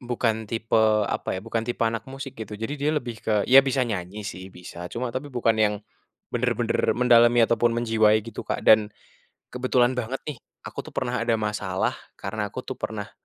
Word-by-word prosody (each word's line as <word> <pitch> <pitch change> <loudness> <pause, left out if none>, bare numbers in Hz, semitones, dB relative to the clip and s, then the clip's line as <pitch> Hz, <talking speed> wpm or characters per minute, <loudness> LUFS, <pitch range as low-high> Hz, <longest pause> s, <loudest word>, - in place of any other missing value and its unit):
bukan 115 -3 -1
tipe 115 0 +1 0.2
apa 95 - -2
ya, - - -4
bukan 115 0 -1
tipe 115 +1 -2
anak 115 +1 -2
musik 135 0 -7
gitu. 105 -1 -6
Jadi 115 +7 -4
dia 145 - +1
lebih 120 -6 -4
ke 105 -2 +1
ya 135 +2 +8
bisa 135 -1 0
nyanyi 105 -2 -4
sih 95 -1 -7
bisa, 90 -1 -9
cuma 120 +4 -4
tapi 145 +3 -4
bukan 120 -4 +1
yang 105 -1 +3 0.6
bener-bener - - 0
mendalami 120 -1 +6
ataupun 115 +1 +2
menjiwai 110 -2 +3
gitu, 115 - -7
Kak. - - -2
Dan 110 -1 +6 0.6
kebetulan 125 0 +1
banget 125 +2 -3
nih 145 - -6 0.2
aku - - -7
tuh - - -11
pernah 125 -1 -1
ada 115 0 +1
masalah 100 -3 -1 0.2
karena 105 +1 -4
aku - - -4
tuh - - -7
pernah 105 -1 -5
115 Hz, 185 wpm, -25 LUFS, 105-125 Hz, 0.6 s, ya